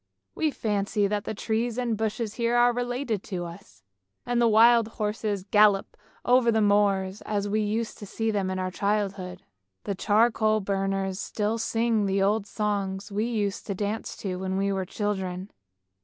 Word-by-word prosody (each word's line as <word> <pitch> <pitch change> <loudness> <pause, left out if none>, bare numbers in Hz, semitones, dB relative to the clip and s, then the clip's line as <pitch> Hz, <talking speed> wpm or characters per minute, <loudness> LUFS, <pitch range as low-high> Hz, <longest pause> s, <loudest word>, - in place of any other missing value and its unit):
We 315 - +1
fancy 205 -4 0
that 205 +1 -1
the - - -4
trees 225 +3 -1
and 240 -3 0
bushes 220 0 -2
here 235 0 0
are 240 0 +5
related 245 -3 -2
to 180 -4 -4
us; 170 - -12 0.4
and 240 0 +1
the 235 - +5
wild 230 +1 +6
horses 210 -2 -2
gallop 205 0 +3 0.3
over 245 -1 +4
the 220 - +2
moors, 200 -2 +2
as 205 -1 -2
we 215 +2 0
used 215 +2 -2
to 205 - -8
see 225 +3 -1
them 200 -3 -1
in 185 - -2
our 185 0 -2
childhood. 195 -2 -2 0.4
The 200 - -2
charcoal 215 +2 +2
burners 195 -1 -1
still 215 +2 -2
sing 225 -2 +1
the 195 0 +1
old 205 +2 +1
songs 200 -1 -2
we 210 +2 0
used 210 -4 -2
to 200 - -2
dance 210 +3 -3
to 185 -2 -2
when 190 0 -2
we 200 0 +1
were 190 -1 -2
children. 190 -2 -3
210 Hz, 170 wpm, -26 LUFS, 195-225 Hz, 0.4 s, wild